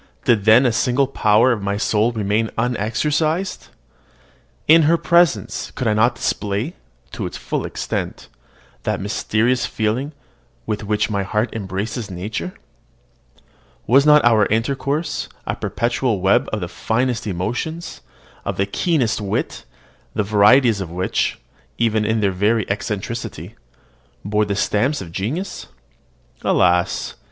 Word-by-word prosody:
did 110 Hz, -4 st, +3 dB
then 110 Hz, +5 st, +6 dB
a 125 Hz, -, +4 dB
single 125 Hz, +3 st, +2 dB
power 115 Hz, -2 st, +3 dB
of 115 Hz, -4 st, -1 dB
my 100 Hz, +1 st, -1 dB
soul 110 Hz, +2 st, +1 dB
remain 110 Hz, 0 st, 0 dB
unexercised? 145 Hz, -, -1 dB, 1.0 s
In 165 Hz, +2 st, +7 dB
her 170 Hz, -, +4 dB
presence 170 Hz, -1 st, +2 dB
could 130 Hz, -, -2 dB
I 110 Hz, -, +3 dB
not 120 Hz, +3 st, +3 dB
display, 105 Hz, -, -2 dB, 0.4 s
to -, -, -4 dB
its -, -, -7 dB
full -, -, -3 dB
extent, -, -, -4 dB, 0.5 s
that -, -, -2 dB
mysterious 110 Hz, +4 st, 0 dB
feeling 120 Hz, +7 st, -2 dB, 0.5 s
with 110 Hz, 0 st, -3 dB
which 105 Hz, +1 st, 0 dB
my 100 Hz, -1 st, 0 dB
heart 105 Hz, +4 st, -1 dB
embraces 105 Hz, +2 st, -4 dB
nature? 105 Hz, -, -5 dB, 1.3 s
Was 135 Hz, +4 st, +5 dB
not 150 Hz, -2 st, +6 dB
our 110 Hz, -3 st, +5 dB
intercourse 140 Hz, +7 st, -1 dB, 0.2 s
a -, -, -2 dB
perpetual 120 Hz, -2 st, -1 dB
web 95 Hz, +1 st, +2 dB
of 110 Hz, -, -2 dB
the 90 Hz, -, -3 dB
finest 120 Hz, +5 st, -1 dB
emotions, 120 Hz, -, -4 dB, 0.4 s
of -, -, -3 dB
the 95 Hz, -, +2 dB
keenest 120 Hz, -, 0 dB
wit, 100 Hz, -10 st, -3 dB, 0.5 s
the 105 Hz, -, +1 dB
varieties 105 Hz, +2 st, +4 dB
of 95 Hz, -, -5 dB
which, 90 Hz, +2 st, -1 dB, 0.4 s
even 110 Hz, -2 st, +1 dB
in 110 Hz, 0 st, +1 dB
their 100 Hz, -2 st, +2 dB
very 105 Hz, +3 st, +1 dB
eccentricity, 105 Hz, +3 st, -4 dB, 0.7 s
bore 105 Hz, +1 st, +1 dB
the 100 Hz, -1 st, -2 dB
stamp 120 Hz, +8 st, +1 dB
of 85 Hz, -4 st, -8 dB
genius? 150 Hz, -, -4 dB, 0.7 s
Alas! 90 Hz, -1 st, +2 dB
110 Hz, 130 wpm, -20 LUFS, 105-130 Hz, 1.3 s, In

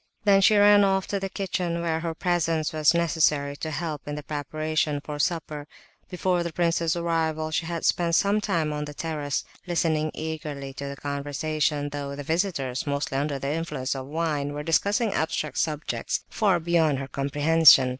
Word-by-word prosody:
Then 200 Hz, -2 st, +5 dB
she 210 Hz, +2 st, +5 dB
ran 205 Hz, 0 st, +7 dB
off 190 Hz, -1 st, +2 dB
to 200 Hz, -, -1 dB
the 195 Hz, 0 st, -3 dB
kitchen, 180 Hz, -3 st, -2 dB
where 165 Hz, -1 st, -1 dB
her 165 Hz, -1 st, -3 dB
presence 165 Hz, -3 st, 0 dB
was 155 Hz, +1 st, +3 dB
necessary 155 Hz, -4 st, +2 dB
to 160 Hz, -, -4 dB
help 155 Hz, -1 st, -4 dB
in 145 Hz, -, -3 dB
the 150 Hz, -, -6 dB
preparations 155 Hz, +1 st, -2 dB
for 150 Hz, -1 st, -6 dB
supper. 150 Hz, -3 st, -2 dB, 0.4 s
Before 180 Hz, -1 st, 0 dB
the 170 Hz, -1 st, -3 dB
prince's 165 Hz, 0 st, +1 dB
arrival 160 Hz, -2 st, -1 dB
she 165 Hz, +1 st, -1 dB
had 170 Hz, -1 st, -3 dB
spent 170 Hz, -1 st, +2 dB
some 205 Hz, +3 st, +3 dB
time 165 Hz, -7 st, 0 dB
on 150 Hz, 0 st, -3 dB
the 150 Hz, 0 st, -9 dB
terrace, 150 Hz, -3 st, -2 dB, 0.2 s
listening 160 Hz, -3 st, +1 dB
eagerly 150 Hz, -3 st, -5 dB
to 140 Hz, +1 st, -6 dB
the 140 Hz, -, -5 dB
conversation, 145 Hz, +1 st, -2 dB
though 140 Hz, -1 st, -5 dB
the 145 Hz, -, -6 dB
visitors, 160 Hz, -6 st, -1 dB
mostly 140 Hz, -1 st, -2 dB
under 145 Hz, 0 st, -1 dB
the 140 Hz, +2 st, -2 dB
influence 150 Hz, -5 st, -2 dB
of 135 Hz, -1 st, -6 dB
wine, 150 Hz, -2 st, -1 dB
were 145 Hz, 0 st, -4 dB
discussing 200 Hz, +7 st, +1 dB
abstract 160 Hz, -1 st, -1 dB
subjects 155 Hz, -, -1 dB
far 195 Hz, -6 st, +2 dB
beyond 165 Hz, -3 st, +2 dB
her 135 Hz, 0 st, -5 dB
comprehension. 145 Hz, 0 st, +5 dB
155 Hz, 175 wpm, -26 LUFS, 145-170 Hz, 0.4 s, ran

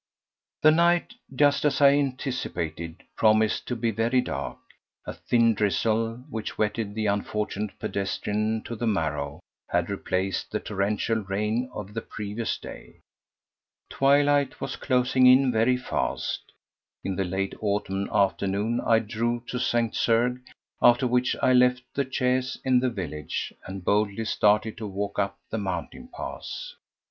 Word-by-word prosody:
4. 155 Hz, -, +8 dB
The -, -, +3 dB
night—just 170 Hz, -, +2 dB
as 145 Hz, -2 st, +2 dB
I 140 Hz, -1 st, +8 dB
anticipated—promised 110 Hz, -, 0 dB
to 125 Hz, -, -2 dB
be 115 Hz, 0 st, 0 dB
very 115 Hz, +4 st, +1 dB
dark. -, -, -3 dB, 0.5 s
A -, -, -5 dB
thin 115 Hz, -1 st, +2 dB
drizzle, 115 Hz, +4 st, 0 dB
which 110 Hz, -6 st, -5 dB
wetted 105 Hz, -1 st, -1 dB
the 110 Hz, -1 st, -1 dB
unfortunate 105 Hz, 0 st, -2 dB
pedestrian 105 Hz, +2 st, -2 dB
to 120 Hz, -, -6 dB
the 115 Hz, +1 st, -2 dB
marrow, 75 Hz, -8 st, -1 dB, 0.3 s
had 85 Hz, +2 st, 0 dB
replaced 95 Hz, -1 st, -2 dB
the -, -, -2 dB
torrential 105 Hz, +2 st, -1 dB
rain 105 Hz, +5 st, -1 dB
of 105 Hz, -2 st, -7 dB
the 115 Hz, -, -3 dB
previous 105 Hz, +1 st, -4 dB
day. -, -, -11 dB, 1.0 s
Twilight 145 Hz, +1 st, +3 dB
was 135 Hz, -1 st, -4 dB
closing 130 Hz, -1 st, +3 dB
in 130 Hz, +1 st, +6 dB
very 120 Hz, +2 st, +3 dB
fast. 125 Hz, -, -3 dB, 0.5 s
In 95 Hz, -, -2 dB
the 95 Hz, -, 0 dB
late 95 Hz, +1 st, -2 dB
autumn 100 Hz, -2 st, -1 dB
afternoon 100 Hz, +4 st, +1 dB
I 115 Hz, -, +4 dB
drove 115 Hz, +2 st, -2 dB
to 125 Hz, -, -2 dB
St. 120 Hz, -2 st, +1 dB
Cergues, 120 Hz, +2 st, +2 dB, 0.4 s
after 120 Hz, +2 st, +5 dB
which 125 Hz, 0 st, +2 dB
I 130 Hz, -, +5 dB
left 125 Hz, 0 st, +4 dB
the 140 Hz, -2 st, -2 dB
chaise 130 Hz, 0 st, 0 dB
in 130 Hz, -1 st, +4 dB
the 130 Hz, 0 st, +1 dB
village 75 Hz, -9 st, -4 dB
and 95 Hz, -1 st, -7 dB
boldly 105 Hz, +1 st, +1 dB
started 105 Hz, +1 st, +2 dB
to 110 Hz, -, -4 dB
walk 100 Hz, +1 st, -3 dB
up 100 Hz, 0 st, -1 dB
the 110 Hz, -, -1 dB
mountain 90 Hz, -5 st, -5 dB
pass. -, -, -6 dB
110 Hz, 140 wpm, -26 LUFS, 100-125 Hz, 1.0 s, 4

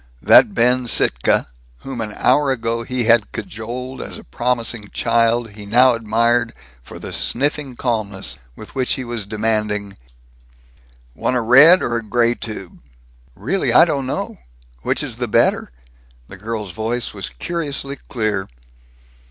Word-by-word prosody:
That -, -, +6 dB
Ben 125 Hz, +1 st, +2 dB
Sittka 60 Hz, -, +2 dB, 0.4 s
whom 130 Hz, -3 st, -6 dB
an 105 Hz, -1 st, -5 dB
hour 140 Hz, +2 st, +3 dB
ago 115 Hz, -2 st, -1 dB
he 125 Hz, +1 st, -1 dB
had 115 Hz, -2 st, +3 dB
cajoled 120 Hz, +4 st, -6 dB
as -, -, -7 dB
a -, -, -12 dB
promising 115 Hz, -, -2 dB
child 115 Hz, -1 st, +1 dB
he 105 Hz, 0 st, -11 dB
now 125 Hz, +4 st, +5 dB
admired 115 Hz, +1 st, +1 dB, 0.3 s
for -, -, -11 dB
the -, -, -7 dB
sniffing 140 Hz, 0 st, -2 dB
calmness 105 Hz, -, -3 dB, 0.2 s
with 110 Hz, -, -12 dB
which 130 Hz, -2 st, 0 dB
he 130 Hz, -, -3 dB
was 120 Hz, -4 st, -5 dB
demanding, 105 Hz, -2 st, -2 dB, 1.2 s
"Want 125 Hz, -, -1 dB
a 125 Hz, -, +1 dB
red 145 Hz, +10 st, +7 dB
or 120 Hz, -1 st, -1 dB
gray 115 Hz, +2 st, +1 dB
tube?" 110 Hz, -6 st, -8 dB, 0.6 s
"Really, 140 Hz, -, -1 dB
I 170 Hz, -, +7 dB
don't 140 Hz, -6 st, -2 dB
know. 200 Hz, -, -4 dB, 0.4 s
Which -, -, -1 dB
is -, -, -5 dB
the -, -, -2 dB
better?" -, -, +2 dB, 0.6 s
The 95 Hz, -, -11 dB
girl's 105 Hz, -1 st, -5 dB
voice 115 Hz, +6 st, -2 dB
was 95 Hz, -5 st, -5 dB
curiously 140 Hz, -, -4 dB
clear. 110 Hz, -5 st, -1 dB
115 Hz, 145 wpm, -19 LUFS, 110-125 Hz, 1.2 s, red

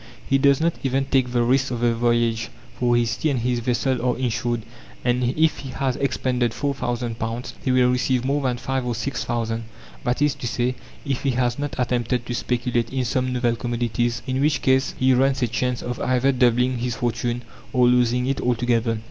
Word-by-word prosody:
He 135 Hz, -, +3 dB
does 140 Hz, 0 st, +4 dB
not 165 Hz, +1 st, +2 dB
even 135 Hz, 0 st, 0 dB
take 130 Hz, -2 st, +1 dB
the 120 Hz, -1 st, +2 dB
risks 130 Hz, +3 st, +2 dB
of 120 Hz, -2 st, -3 dB
the 120 Hz, -1 st, +3 dB
voyage, 115 Hz, -1 st, +1 dB, 0.2 s
for 120 Hz, -1 st, +1 dB
his 115 Hz, -1 st, +1 dB
tea 155 Hz, -, 0 dB
and 130 Hz, -5 st, 0 dB
his 120 Hz, 0 st, 0 dB
vessel 125 Hz, +1 st, 0 dB
are 125 Hz, -1 st, +1 dB
insured, 120 Hz, -2 st, -1 dB, 0.4 s
and 125 Hz, 0 st, +2 dB, 0.2 s
if 160 Hz, 0 st, +3 dB
he 135 Hz, -, -7 dB
has 130 Hz, 0 st, -1 dB
expended 125 Hz, -3 st, 0 dB
four 140 Hz, -1 st, -1 dB
thousand 120 Hz, -3 st, -3 dB
pounds 115 Hz, +2 st, -4 dB
he 130 Hz, -, +1 dB
will 125 Hz, -1 st, +4 dB
receive 125 Hz, 0 st, +1 dB
more 140 Hz, +2 st, +1 dB
than 125 Hz, -3 st, 0 dB
five 130 Hz, +1 st, -2 dB
or 120 Hz, -1 st, -2 dB
six 130 Hz, +4 st, -3 dB
thousand; 115 Hz, -1 st, -2 dB, 0.4 s
that 125 Hz, -, 0 dB
is 145 Hz, -1 st, +3 dB
to 120 Hz, -, -5 dB
say, 120 Hz, +2 st, 0 dB, 0.3 s
if 135 Hz, -3 st, -1 dB
he 140 Hz, -, 0 dB
has 125 Hz, 0 st, 0 dB
not 145 Hz, -2 st, -3 dB
attempted 125 Hz, -1 st, 0 dB
to 120 Hz, -, -4 dB
speculate 120 Hz, -1 st, -1 dB
in 130 Hz, -1 st, -1 dB
some 130 Hz, +1 st, 0 dB
novel 120 Hz, -2 st, +1 dB
commodities, 120 Hz, 0 st, -1 dB
in 130 Hz, 0 st, -1 dB
which 145 Hz, -3 st, +1 dB
case 130 Hz, +1 st, +2 dB
he 130 Hz, 0 st, +4 dB
runs 135 Hz, +1 st, +2 dB
a -, -, +3 dB
chance 125 Hz, +1 st, -1 dB
of 125 Hz, 0 st, -4 dB
either 130 Hz, +2 st, +2 dB
doubling 125 Hz, 0 st, +2 dB
his 120 Hz, -1 st, -2 dB
fortune 120 Hz, 0 st, -2 dB, 0.3 s
or 125 Hz, -1 st, +4 dB
losing 125 Hz, 0 st, +3 dB
it 135 Hz, +1 st, -1 dB
altogether. 120 Hz, -1 st, +1 dB
125 Hz, 205 wpm, -23 LUFS, 120-130 Hz, 0.4 s, does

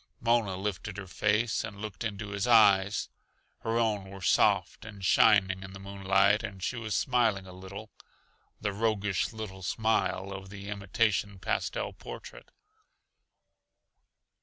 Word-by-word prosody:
Mona 115 Hz, -5 st, +1 dB
lifted 100 Hz, 0 st, -4 dB
her 100 Hz, -, -6 dB
face 105 Hz, +4 st, +1 dB
and 100 Hz, -3 st, -7 dB
looked 105 Hz, -3 st, -6 dB
into 105 Hz, -2 st, -4 dB
his 100 Hz, +2 st, -2 dB
eyes. 105 Hz, -3 st, +5 dB, 0.5 s
Her 115 Hz, +1 st, -1 dB
own 105 Hz, -4 st, 0 dB
were 95 Hz, -1 st, -10 dB
soft -, -, +2 dB
and 100 Hz, -3 st, -8 dB
shining 95 Hz, -1 st, +4 dB
in 95 Hz, 0 st, -9 dB
the 95 Hz, -, -9 dB
moonlight, 100 Hz, +1 st, +2 dB
and 95 Hz, -2 st, -7 dB
she 130 Hz, -, -1 dB
was 110 Hz, -3 st, -3 dB
smiling 115 Hz, -7 st, +2 dB
a 90 Hz, -, -11 dB
little 95 Hz, +4 st, -9 dB, 0.7 s
the 105 Hz, -2 st, -2 dB
roguish 105 Hz, -2 st, 0 dB
little 110 Hz, -4 st, -7 dB
smile 100 Hz, -1 st, 0 dB
of 95 Hz, 0 st, -7 dB
the 100 Hz, 0 st, -8 dB
imitation 100 Hz, 0 st, 0 dB
pastel -, -, -2 dB
portrait. -, -, -10 dB
100 Hz, 135 wpm, -29 LUFS, 95-110 Hz, 0.7 s, eyes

